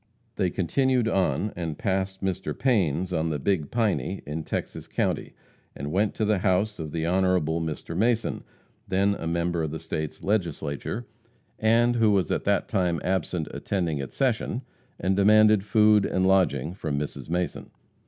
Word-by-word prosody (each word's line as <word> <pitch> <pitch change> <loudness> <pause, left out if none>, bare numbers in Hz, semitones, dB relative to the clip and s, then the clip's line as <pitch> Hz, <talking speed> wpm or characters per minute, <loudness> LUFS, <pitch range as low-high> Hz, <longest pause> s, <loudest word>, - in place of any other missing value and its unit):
They 90 - +1
continued 125 +7 +1
on, 100 0 0
and 80 -4 -4
passed 95 0 -2
Mr. 90 -6 -2
Payne's 95 - +1
on 80 -1 0
the 75 - -1
Big 80 -1 0
Piney, 105 -4 -1
in 75 +2 -4
Texas - - -4
county, - - -2 0.4
and 70 +2 -5
went 100 +4 +1
to 110 - 0
the 105 -2 +2
house 100 +2 +1
of 80 -2 -5
the 80 0 -2
Hon. 95 +3 +2 0.4
Mr. 80 0 -4
Mason, 115 +4 +1 0.4
then 100 +2 +2
a 80 - -5
member 85 0 0
of 80 - -1
the 80 - -4
State 80 -1 -5
Legislature, 85 +1 -2 0.5
and 120 +2 +3
who 110 -2 +4
was 95 -5 +2
at - - -1
that - - +1
time 90 -3 0
absent 90 -3 -1
attending 85 -7 -2
its 70 - -6
session, 125 -1 0 0.4
and 95 +1 +1
demanded 105 0 +5
food 105 -1 +4
and 95 0 +1
lodging 90 -5 +2
from 80 -6 -3
Mrs. 75 +1 -5
Mason. 90 +1 -2
95 Hz, 165 wpm, -26 LUFS, 80-105 Hz, 0.5 s, demanded